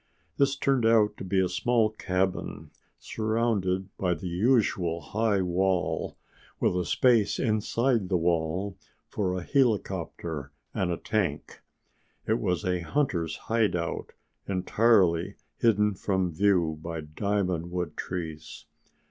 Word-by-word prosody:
This 140 Hz, 0 st, +3 dB
turned 135 Hz, -2 st, +1 dB
out 115 Hz, -2 st, +4 dB
to -, -, -7 dB
be 95 Hz, +1 st, 0 dB
a 95 Hz, -, +3 dB
small 110 Hz, +4 st, +1 dB
cabin, 95 Hz, -3 st, -2 dB, 0.3 s
surrounded 110 Hz, -4 st, -1 dB
by 90 Hz, -2 st, +1 dB
the 85 Hz, +3 st, -6 dB
usual 90 Hz, -4 st, +2 dB
high 105 Hz, 0 st, 0 dB
wall, 90 Hz, +1 st, 0 dB, 0.4 s
with -, -, +2 dB
a 90 Hz, -1 st, 0 dB
space 110 Hz, -1 st, +3 dB
inside 115 Hz, -1 st, +1 dB
the 95 Hz, -, +2 dB
wall 85 Hz, +3 st, 0 dB, 0.3 s
for 95 Hz, -3 st, -1 dB
a 90 Hz, -, -4 dB
helicopter 85 Hz, -, -1 dB, 0.2 s
and 95 Hz, -, 0 dB
a 85 Hz, -, -1 dB
tank. 110 Hz, -4 st, -2 dB, 0.6 s
It 110 Hz, +2 st, +1 dB
was 90 Hz, -1 st, -1 dB
a 90 Hz, -1 st, +1 dB
hunters' 85 Hz, -, -1 dB
hideout 105 Hz, -7 st, -1 dB, 0.3 s
entirely 95 Hz, -2 st, +2 dB, 0.2 s
hidden 105 Hz, -2 st, +3 dB
from 95 Hz, -2 st, -1 dB
view 85 Hz, -4 st, +2 dB
by 85 Hz, 0 st, -5 dB
diamond 90 Hz, +1 st, -1 dB
wood 90 Hz, -3 st, -3 dB
trees. 80 Hz, -4 st, -6 dB
95 Hz, 125 wpm, -27 LUFS, 85-110 Hz, 0.6 s, out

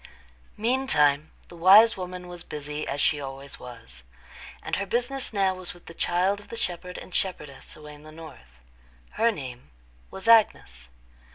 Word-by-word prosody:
Meantime 160 Hz, -, +2 dB, 0.2 s
the -, -, -13 dB
wise 205 Hz, +7 st, +7 dB
woman 180 Hz, -1 st, -7 dB
was 175 Hz, -1 st, -8 dB
busy 150 Hz, 0 st, -5 dB
as 145 Hz, -, -3 dB
she 145 Hz, 0 st, +2 dB
always 135 Hz, 0 st, -8 dB
was; 115 Hz, -, -11 dB, 0.6 s
and -, -, -2 dB
her 200 Hz, -, -2 dB
business 245 Hz, +5 st, -1 dB
now 195 Hz, -3 st, +2 dB
was 185 Hz, -1 st, -7 dB
with 175 Hz, -, -18 dB
the 165 Hz, -, -10 dB
child 180 Hz, +4 st, +1 dB
of 205 Hz, -, -15 dB
the 230 Hz, -, -7 dB
shepherd 180 Hz, -3 st, -4 dB
and 185 Hz, -, -10 dB
shepherdess, 150 Hz, -8 st, -4 dB
away 150 Hz, -1 st, -11 dB
in 145 Hz, -, -14 dB
the 155 Hz, 0 st, -13 dB
north. 65 Hz, -, -13 dB, 0.5 s
Her 230 Hz, +1 st, +2 dB
name 130 Hz, -, -8 dB, 0.4 s
was 190 Hz, +3 st, -8 dB
Agnes. 65 Hz, -, +4 dB
175 Hz, 165 wpm, -26 LUFS, 145-200 Hz, 0.6 s, wise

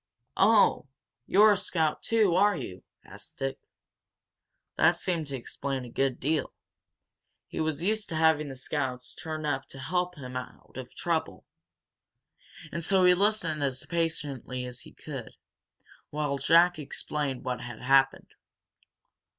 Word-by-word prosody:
"Oh, 210 Hz, -7 st, +4 dB, 0.4 s
you're 210 Hz, +2 st, +6 dB
a 205 Hz, -, +3 dB
scout, 165 Hz, -5 st, 0 dB
too, 220 Hz, -6 st, +2 dB
are 205 Hz, +3 st, +4 dB
you?" 95 Hz, -10 st, -7 dB, 0.2 s
asked -, -, -11 dB
Dick. 135 Hz, 0 st, -3 dB, 1.2 s
That 175 Hz, -, +4 dB
seemed 170 Hz, -3 st, -1 dB
to 140 Hz, -, -2 dB
explain 135 Hz, +1 st, -4 dB
a 120 Hz, -, -10 dB
good 135 Hz, -1 st, 0 dB
deal. 155 Hz, +3 st, -1 dB, 0.9 s
He -, -, -7 dB
was 160 Hz, 0 st, -1 dB
used 215 Hz, +2 st, 0 dB
to 165 Hz, -, -3 dB
having 155 Hz, -2 st, +3 dB
scouts 130 Hz, -2 st, -3 dB
turn 155 Hz, -1 st, -5 dB
up 135 Hz, -2 st, -1 dB
to -, -, -10 dB
help 180 Hz, +6 st, -1 dB
him 125 Hz, -4 st, -8 dB
out 130 Hz, 0 st, -8 dB
of -, -, -8 dB
trouble. -, -, -2 dB, 1.3 s
And 170 Hz, -, -3 dB
so 190 Hz, +2 st, +4 dB
he 180 Hz, -, +7 dB
listened 185 Hz, -5 st, +1 dB
as 130 Hz, -2 st, -2 dB
patiently 150 Hz, -7 st, -2 dB
as 125 Hz, 0 st, -7 dB
he -, -, -12 dB
could, -, -, -8 dB, 0.7 s
while 145 Hz, -2 st, -2 dB
Jack 170 Hz, +4 st, +5 dB
explained 145 Hz, -2 st, -3 dB
what 125 Hz, -1 st, -3 dB
had 120 Hz, -2 st, -8 dB
happened. 135 Hz, +1 st, +3 dB
150 Hz, 140 wpm, -28 LUFS, 135-175 Hz, 1.3 s, he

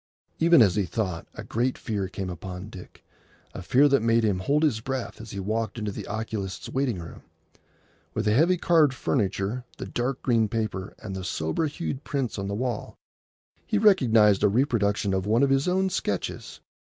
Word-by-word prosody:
Even 165 Hz, -5 st, +7 dB
as 100 Hz, -1 st, +2 dB
he 100 Hz, -, +2 dB
thought, 90 Hz, -4 st, -3 dB
a -, -, -7 dB
great 125 Hz, +3 st, -1 dB
fear 100 Hz, -4 st, -3 dB
came 95 Hz, 0 st, -5 dB
upon 90 Hz, +3 st, -7 dB
Dick, 90 Hz, -3 st, -12 dB, 0.5 s
a -, -, -6 dB
fear 130 Hz, +10 st, +4 dB
that 140 Hz, -4 st, +3 dB
made 115 Hz, 0 st, +3 dB
him 100 Hz, -4 st, +1 dB
hold 145 Hz, +10 st, +1 dB
his 135 Hz, -8 st, +2 dB
breath 130 Hz, 0 st, -4 dB
as 115 Hz, -, -10 dB
he 100 Hz, -, -6 dB
walked 110 Hz, +3 st, -2 dB
into 105 Hz, -2 st, -3 dB
the -, -, -7 dB
oculist's 105 Hz, -4 st, -4 dB
waiting 130 Hz, -6 st, -1 dB
room, 85 Hz, -1 st, -9 dB, 0.9 s
with 110 Hz, -, -1 dB
the 105 Hz, -, +3 dB
heavy 170 Hz, +9 st, +4 dB
carved 160 Hz, -6 st, +3 dB
furniture, 105 Hz, 0 st, -1 dB
the -, -, -5 dB
dark 125 Hz, +2 st, -2 dB
green 115 Hz, -3 st, +3 dB
paper, 105 Hz, -4 st, -3 dB
and 95 Hz, -3 st, -5 dB
the 95 Hz, -, -5 dB
sober 85 Hz, -, -1 dB
hued 145 Hz, -2 st, -5 dB
prints 135 Hz, -7 st, -2 dB
on 100 Hz, -, -3 dB
the 100 Hz, -, -3 dB
wall. 120 Hz, -1 st, -3 dB, 0.7 s
He 215 Hz, -, +1 dB
recognised 115 Hz, -, +5 dB
a 105 Hz, -, +5 dB
reproduction 105 Hz, -4 st, +1 dB
of 95 Hz, +1 st, -1 dB
one 115 Hz, +5 st, +3 dB
of 140 Hz, -, +3 dB
his 135 Hz, +3 st, +2 dB
own 190 Hz, +1 st, +1 dB
sketches. 100 Hz, -, -3 dB
110 Hz, 185 wpm, -26 LUFS, 100-135 Hz, 0.9 s, Even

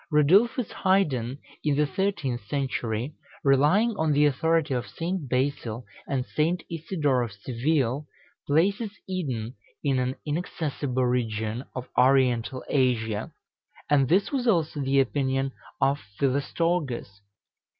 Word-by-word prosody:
Radulphus 195 Hz, -, +4 dB
Highden, 140 Hz, -, +1 dB, 0.3 s
in 150 Hz, -2 st, +2 dB
the 150 Hz, +1 st, +3 dB
thirteenth 145 Hz, -, -1 dB
century, 130 Hz, -2 st, -2 dB, 0.3 s
relying 150 Hz, -, +4 dB
on 160 Hz, -3 st, +2 dB
the 145 Hz, +1 st, +4 dB
authority 160 Hz, +1 st, +2 dB
of 125 Hz, -1 st, -2 dB
St. 170 Hz, -4 st, -4 dB
Basil 125 Hz, -3 st, -1 dB, 0.2 s
and 130 Hz, -3 st, -1 dB
St. 165 Hz, +5 st, 0 dB
Isidore 155 Hz, -5 st, 0 dB
of 120 Hz, -2 st, -3 dB
Seville, 130 Hz, +6 st, -1 dB, 0.4 s
places 195 Hz, +9 st, +2 dB, 0.2 s
Eden 130 Hz, -12 st, -3 dB, 0.3 s
in 135 Hz, -3 st, +2 dB
an 125 Hz, +1 st, -1 dB
inaccessible 145 Hz, -5 st, -2 dB
region 115 Hz, -1 st, -1 dB
of 130 Hz, -1 st, -5 dB
Oriental 125 Hz, -2 st, +3 dB
Asia; 115 Hz, -5 st, 0 dB, 0.6 s
and 140 Hz, -3 st, +4 dB
this 190 Hz, +4 st, +3 dB
was 260 Hz, -3 st, -1 dB
also 165 Hz, -8 st, +2 dB
the 135 Hz, 0 st, +2 dB
opinion 135 Hz, 0 st, +1 dB, 0.3 s
of 140 Hz, +2 st, +2 dB, 0.2 s
Philostorgus. 140 Hz, -, -1 dB
140 Hz, 120 wpm, -26 LUFS, 125-160 Hz, 0.6 s, Radulphus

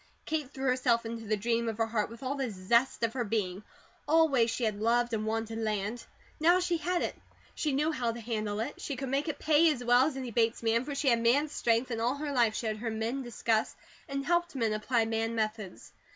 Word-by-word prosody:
Kate 305 Hz, -4 st, -2 dB
threw 270 Hz, -1 st, -6 dB
herself 250 Hz, -2 st, +2 dB
into 225 Hz, 0 st, -5 dB
the 215 Hz, 0 st, +1 dB
dream 230 Hz, +2 st, 0 dB
of 220 Hz, -, -5 dB
her 225 Hz, -, +2 dB
heart 220 Hz, -2 st, -1 dB
with 230 Hz, +3 st, -11 dB
all 260 Hz, +1 st, -1 dB
the 270 Hz, -3 st, -2 dB
zest 230 Hz, +7 st, +1 dB
of 230 Hz, -, +1 dB
her 255 Hz, -2 st, -1 dB
being. 200 Hz, -4 st, -2 dB, 0.5 s
Always 295 Hz, -7 st, +4 dB
she 240 Hz, -, -2 dB
had 215 Hz, -2 st, 0 dB
loved 240 Hz, +1 st, +2 dB
and 215 Hz, -1 st, -1 dB
wanted 225 Hz, 0 st, -2 dB
land. 215 Hz, +1 st, -2 dB, 0.3 s
Now 345 Hz, +4 st, +5 dB
she 355 Hz, -1 st, 0 dB
had 350 Hz, +2 st, -1 dB
it. -, -, -3 dB, 0.4 s
She 305 Hz, -, -1 dB
knew 300 Hz, +4 st, +1 dB
how 245 Hz, -6 st, -1 dB
to 235 Hz, -, -7 dB
handle 215 Hz, -2 st, -2 dB
it. -, -, -5 dB
She 280 Hz, -, -3 dB
could 265 Hz, 0 st, -4 dB
make 275 Hz, +4 st, 0 dB
it 310 Hz, -, -2 dB
pay 315 Hz, +1 st, +4 dB
as 250 Hz, -4 st, -4 dB
well 245 Hz, +3 st, +5 dB
as 290 Hz, -4 st, -4 dB
any 255 Hz, -3 st, -5 dB
Bates 230 Hz, +1 st, +1 dB
man, 230 Hz, +2 st, +2 dB
for 290 Hz, -1 st, -4 dB
she 275 Hz, 0 st, +1 dB
had 235 Hz, -1 st, +3 dB
man 275 Hz, +6 st, +3 dB
strength, 240 Hz, -2 st, 0 dB
and 225 Hz, -1 st, -2 dB
all 245 Hz, +4 st, +1 dB
her 290 Hz, 0 st, -4 dB
life 235 Hz, -5 st, +2 dB
she -, -, -3 dB
had 215 Hz, -1 st, -1 dB
heard 225 Hz, 0 st, -3 dB
men 230 Hz, +5 st, -2 dB
discuss, 230 Hz, -2 st, -1 dB, 0.3 s
and 275 Hz, 0 st, -3 dB
helped 345 Hz, -1 st, +1 dB
men 225 Hz, -4 st, +1 dB
apply 225 Hz, +2 st, +1 dB
man 225 Hz, +1 st, -1 dB
methods. 215 Hz, -3 st, -4 dB
235 Hz, 240 wpm, -30 LUFS, 225-275 Hz, 0.5 s, Now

